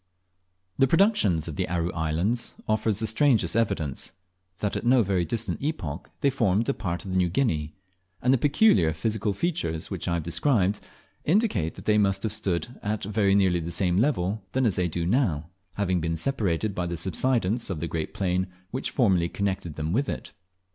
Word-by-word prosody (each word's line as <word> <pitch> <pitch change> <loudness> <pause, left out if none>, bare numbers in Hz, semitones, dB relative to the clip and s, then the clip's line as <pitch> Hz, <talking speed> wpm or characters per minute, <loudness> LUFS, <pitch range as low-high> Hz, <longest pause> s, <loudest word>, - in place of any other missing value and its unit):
The 135 - +5
productions 130 - +3
of 80 - -6
the - - -1
Aru 85 0 -1
Islands 85 +9 0
offer 110 +1 +1
the 105 +2 +1
strangest 110 - +3
evidence, 80 - 0 0.5
that 105 - -2
at - - -2
no 125 0 +5
very 95 -3 0
distant 115 -5 -2
epoch 95 - -4
they 140 - +3
formed 115 -4 +1
a 140 - +2
part 90 -6 -4
of 95 - -5
New 90 -1 +2
Guinea; 80 - 0 0.4
and 125 +2 +3
the 135 - +3
peculiar 135 - +4
physical 105 +5 -1
features 100 - -2
which - - -4
I 85 - +1
have 85 - -2
described, 100 - +1 0.4
indicate 155 - +1
that - - -11
they 105 0 +4
must 100 -1 +1
have 110 - -1
stood 105 +2 -3
at 105 0 -2
very 100 -1 +2
nearly 95 -3 +3
the 85 0 -5
same 90 0 +1
level 105 -6 0
then 130 0 +2
as 105 -6 +2
they 90 -1 +1
do 85 0 -3
now, 85 - 0 0.2
having 95 -3 0
been 80 0 -1
separated 100 - 0
by 90 -2 -2
the 85 0 -3
subsidence 115 +4 0
of 90 -5 -3
the 85 - -2
great 80 -1 -3
plain 95 -1 -1 0.2
which 130 - -2
formerly 95 -9 +2
connected 95 -5 -3
them 80 +2 -2
with 135 +6 +1
it. - - -5
100 Hz, 190 wpm, -26 LUFS, 85-115 Hz, 0.5 s, The